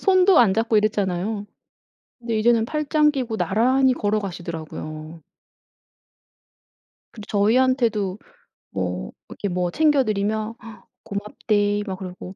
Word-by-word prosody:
손도 375 -1 +5
안 220 -6 +5
잡고 225 +1 +1
이랬잖아요. 205 0 0 0.7
근데 230 -2 -2
이제는 225 0 +3
팔짱 300 +1 +2
끼고 245 -6 -3
나란히 255 +5 +3
걸어가시더라고요. 165 -6 -4 1.9
근데 215 -3 -11
저희한테도 220 -2 +2 0.5
뭐 - - -3 0.2
이렇게 200 - -4
뭐 180 -1 -1
챙겨 295 - +3
드리면 215 +1 -1 0.5
"고맙데이." 205 0 -1
막 190 -1 -4
그러고 185 0 -8
215 Hz, 265 characters per minute, -23 LUFS, 195-245 Hz, 1.9 s, 손도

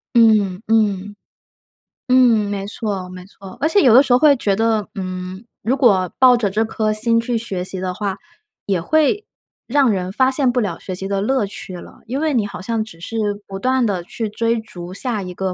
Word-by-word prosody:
嗯， 215 -5 +4
嗯。 205 -2 +1 0.9
嗯， 255 - +4 0.3
没 200 -1 -3
错， 200 -4 -4
没 185 0 -10
错。 195 -1 -13
而 310 - +1
且 365 +5 +3
有 250 -6 +5
的 255 - +9
时 270 -3 +1
候 245 - +5
会 300 0 +6
觉 200 -4 0
得， 220 -2 0
嗯， 185 +1 -6 0.2
如 240 +6 0
果 200 -9 +3
抱 255 -1 +6
着 215 -4 0
这 210 +3 0
颗 215 -1 -1
心 230 +2 +3
去 235 0 -1
学 195 -6 -3
习 185 0 -3
的 185 -1 -2
话， 195 0 -3 0.5
也 195 -3 0
会 315 - +1 0.4
让 270 -1 +3
人 185 -2 -2
发 260 +4 +3
现 265 -1 +2
不 245 0 +1
了 185 -6 -3
学 185 - -6
习 190 - -4
的 195 0 -1
乐 255 +1 +1
趣 195 -1 -7
了， 175 - -12
因 260 +5 -3
为 315 -2 0
你 220 -5 +1
好 195 - -8
像 225 +3 -2
只 215 -7 -9
是 225 +6 -5 0.3
不 195 0 -7
断 255 +2 +1
地 190 -5 -2
去 220 +5 -5
追 230 +2 0
逐 180 -5 -10
下 220 +1 0
一 180 -1 -7
个 190 0 -3
215 Hz, 230 characters per minute, -19 LUFS, 190-240 Hz, 0.9 s, 的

